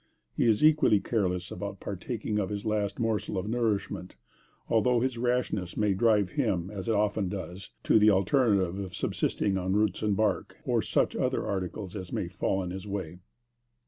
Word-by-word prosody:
He - - +2
is 110 +6 +4
equally 150 -9 +5
careless 90 -6 -1
about 100 -1 -5
partaking 105 +2 -3
of 95 - -1
his 105 0 -4
last 105 -2 -1
morsel 115 -4 -1
of 95 +2 -2
nourishment, 105 -5 -1 0.5
although 115 +2 +3
his 130 +1 0
rashness 120 -7 -1
may 105 -2 +2
drive 105 -2 +3
him, 90 +2 -1
and 100 +1 -5
often 105 -2 +1
does, 95 -1 -6
to - - +5
the 105 0 +6
alternative 100 -2 +2
of 95 -2 -6
subsisting 95 -2 0
on 95 +1 -1
roots 105 -2 +1
and 105 -2 +1
bark, 105 -3 0
or - - +2
such - - +1
other - - 0
articles 95 0 -4
as 95 -3 -6
may - - -2
fall 95 0 -1
in 90 - -5
his 95 +2 -6
way. 95 -4 -5
100 Hz, 175 wpm, -29 LUFS, 95-110 Hz, 0.5 s, the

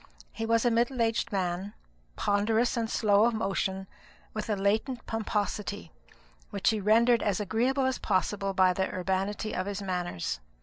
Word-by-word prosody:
He 225 0 -4
was 230 +1 +2
a 240 - +4
middle 240 +3 +1
aged 230 0 +1
man, 190 +1 -2 0.4
ponderous 220 +4 +1
and 230 -2 -1
slow 210 -1 +3
of 235 -1 +1
motion, 190 -2 -1 0.5
with 215 0 -4
a 210 - +2
latent 220 +5 0
pomposity, 210 - -3 0.6
which 200 +1 +1
he 220 - -1
rendered 230 +4 +4
as 200 -3 0
agreeable 245 +7 +1
as 260 0 0
possible 195 0 0
by 185 -1 +4
the 190 +1 -1
urbanity 195 +3 -2
of 185 +1 -2
his 200 0 -4
manners. 175 - -3
210 Hz, 160 wpm, -29 LUFS, 190-225 Hz, 0.6 s, a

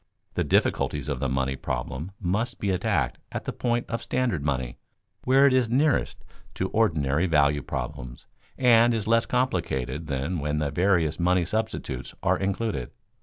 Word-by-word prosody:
The - - 0
difficulties - - +1
of 70 -3 -2
the 70 -1 -1
money 65 +1 0
problem 65 +5 -4
must 105 +7 -1
be 100 - -1
attacked 90 - 0
at - - -5
the - - -3
point 120 -1 -1
of 115 0 -3
standard 120 - -1
money 65 -4 -2 0.5
where 135 +2 +5
it 140 - +5
is 125 -3 +2
nearest 140 +5 +1 0.3
to 95 - -2
ordinary 80 -6 +1
value 75 -3 +3
problems - - -6 0.3
and 120 -2 +5
is 110 -2 -2
less 115 +1 +2
complicated 85 - -1
than 70 +5 -2
when 75 +1 -1
the 75 -2 -1
various 85 -4 +2
money 90 0 +2
substitutes 110 +4 -3
are - - +2
included. 100 +3 -2
90 Hz, 160 wpm, -26 LUFS, 70-115 Hz, 0.5 s, where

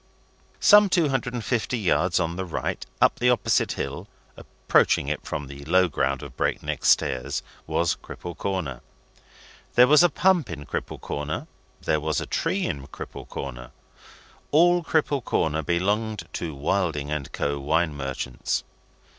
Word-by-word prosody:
Some 210 -1 +7
two 170 -5 +3
hundred 125 -2 -1
and 120 - -4
fifty 120 0 0
yards 90 -4 +2
on 85 -1 -1
the 95 - -3
right, 90 - -3 0.2
up - - +3
the 125 - +3
opposite 125 - +2
hill - - -5 0.3
(approaching - - +1
it - - -2
from 75 - -4
the 70 +1 -10
low 90 +3 +4
ground 70 -3 -1
of 70 -3 -10
Break - - -1
Neck - - -4
Stairs) 65 -1 +2 0.2
was 85 -1 +1
Cripple 85 -1 -8
Corner. 85 -11 -3 0.9
There 125 - +8
was 150 +4 +6
a 175 - +6
pump 175 -1 +2
in 75 - -6
Cripple - - -4
Corner, 75 +1 -4 0.4
there 75 - +1
was 75 -2 0
a - - -4
tree - - -1
in 70 -1 -4
Cripple - - -9
Corner. - - -6 0.8
All 175 +3 +4
Cripple 150 -4 +1
Corner 80 -6 0
belonged 100 +7 -1
to 80 -4 -4
Wilding 75 -1 -1
and 75 -3 -3
Co., 70 0 -2
Wine 80 +3 +1
Merchants. 65 -2 -3
85 Hz, 155 wpm, -25 LUFS, -, 0.9 s, There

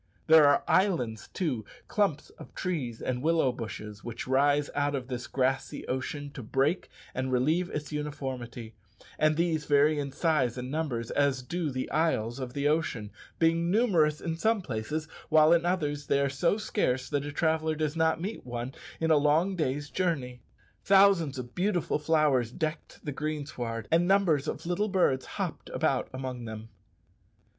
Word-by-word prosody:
There 160 -2 +7
are 145 - +4
islands, 145 - +1
too 145 - -2 0.2
clumps 195 -8 0
of - - -14
trees 140 -11 -3
and 125 -1 -2
willow 160 -3 +3
bushes 105 -3 -7
which 120 -1 -6
rise 145 +2 +3
out 145 0 0
of 130 -1 -5
this 125 -1 -4
grassy 130 0 -1
ocean 145 +2 -3
to 135 - -8
break 135 - 0 0.2
and 130 0 -2
relieve 155 +8 +2
its 150 0 -5
uniformity; 130 -6 -5 0.5
and 155 0 +3
these 165 -3 +1
vary 145 +1 +4
in 140 -1 -3
size 135 -6 +1
and 125 +1 -5
numbers 140 -7 -2
as 140 -3 +1
do 165 +4 -2
the 130 -1 -3
isles 135 -7 0
of 130 0 -6
ocean, 140 -7 0 0.3
being 165 +1 +2
numerous 175 -8 +3
in 165 -2 -3
some 220 +2 +1
places, 145 +5 -3 0.2
while 155 +1 +6
in 170 0 +2
others 145 -6 -1
they 140 - +3
are 140 0 +2
so 170 +8 +1
scarce 130 - -1
that 145 - -1
the 145 +1 -5
traveller 160 +1 +1
does 155 0 -1
not 160 0 +2
meet 200 +6 -5
one 120 +1 -5 0.3
in 160 0 +1
a 155 - +6
long 155 +6 +2
day's 145 -3 -1
journey. 135 -10 -2 0.4
Thousands 190 -8 +5
of 120 -1 -7
beautiful 180 -4 0
flowers 150 -6 +2
decked 155 +4 -5
the 145 - -2
greensward, 135 -7 -4
and 170 +2 +4
numbers 175 -7 +3
of - - -4
little 180 +5 0
birds 175 -9 +2
hopped - - -4
about - - 0
among 130 -2 -5
them. 110 0 -7
145 Hz, 165 wpm, -29 LUFS, 130-165 Hz, 0.5 s, There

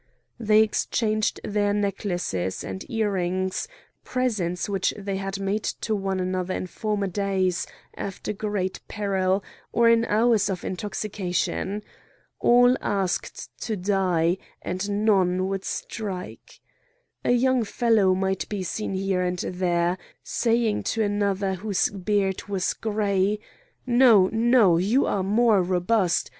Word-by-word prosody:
They 215 -1 +5
exchanged 215 0 0
their 205 0 0
necklaces 180 - -2
and 95 0 -6
earrings, 190 - -1 0.4
presents 210 -9 -1
which 195 -2 0
they 200 -1 -3
had 195 0 -4
made 200 +2 -1
to 220 - -2
one 195 -1 -2
another 185 0 -2
in - - -3
former 210 +2 -2
days, 190 -2 0 0.3
after 200 +2 -5
great 205 -3 -2
peril, 195 -1 0 0.3
or 235 0 +4
in 230 0 +4
hours 220 -1 +3
of 185 -2 -3
intoxication. 200 0 -2 0.6
All 245 +1 +5
asked 195 -3 -2
to 220 -3 -2
die, 180 -2 +1 0.2
and 185 +3 -3 0.2
none 185 -3 +3
would 195 0 -3
strike. 195 -5 -6 0.6
A - - -1
young 255 0 +3
fellow 215 -4 +2
might 190 0 -1
be 205 -3 -3
seen 195 +1 -3
here 190 -1 0
and 180 0 -1
there, 175 0 0 0.2
saying 230 -2 +1 0.2
to 220 - +3
another 200 -1 0
whose 195 +1 0
beard 195 0 -1
was 195 -2 -1
grey: 205 -2 0 0.5
"No! 240 -6 +6
no! 225 -6 +4
you 210 +10 +2
are 200 - 0
more 210 +1 +3
robust! 180 +1 +1
195 Hz, 125 wpm, -25 LUFS, 185-215 Hz, 0.6 s, No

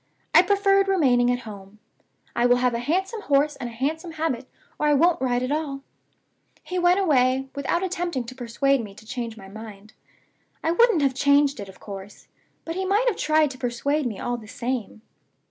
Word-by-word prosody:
I - - +9
preferred 395 +1 +3
remaining 260 -11 +3
at 245 0 0
home. 205 -2 -11 0.6
I 240 +1 +3
will 245 - +5
have 245 0 +1
a 235 - -1
handsome 380 - -1
horse 295 -2 +2
and 245 -3 -5
a - - -11
handsome 320 +8 -3
habit, 305 -6 -2 0.3
or 300 - +1
I 295 - +4
won't 335 +3 +3
ride 250 -1 +1
at 255 - -2
all. 290 -3 -2 0.8
He 365 0 -3
went 355 +2 +4
away, 265 -6 +2
without 280 +6 -1
attempting 350 -7 -2
to 240 +2 -9
persuade 255 +1 0
me 200 -2 -10
to 220 - -15
change 230 -1 -5
my 195 -2 -11
mind. 215 +1 -11 0.7
I 325 - +1
wouldn't 360 -4 +4
have 270 -1 +2
changed 280 0 +3
it, 200 -1 -7
of 190 - -14
course; 200 0 -10 0.4
but 330 - -3
he 380 +2 -2
might 405 +6 +2
have 435 - -3
tried 310 -1 +2
to 260 - -11
persuade 270 +4 -1
me 215 -5 -5
all 245 0 -2
the 220 -2 -12
same. 235 -1 -4
270 Hz, 195 wpm, -24 LUFS, 240-325 Hz, 0.8 s, I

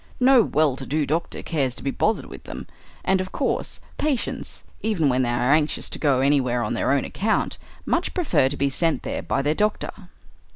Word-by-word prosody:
No 260 -1 +6
well 155 - +2
to 135 - -6
do 150 +1 0
doctor 160 +4 -2
cares 135 -6 -1
to - - -6
be 135 - 0
bothered 220 +9 0
with - - -11
them. - - -7 0.4
And 190 0 +3
of 185 0 -6
course - - -2 0.2
patients, 290 -5 -2 0.2
even 185 -10 +1
when 130 0 +2
they 125 - +1
are 120 +3 +2
anxious 155 0 +1
to - - -6
go 140 -4 +3
anywhere 130 -3 +2
on 105 - -2
their - - +1
own 140 -1 +2
account, 220 +2 -1 0.3
much - - 0
prefer 315 - +2
to 145 - -2
be 140 - +2
sent 165 +3 0
there - - -3
by 135 - -1
their 145 +2 +2
doctor. 210 +5 0
150 Hz, 205 wpm, -24 LUFS, 135-190 Hz, 0.4 s, No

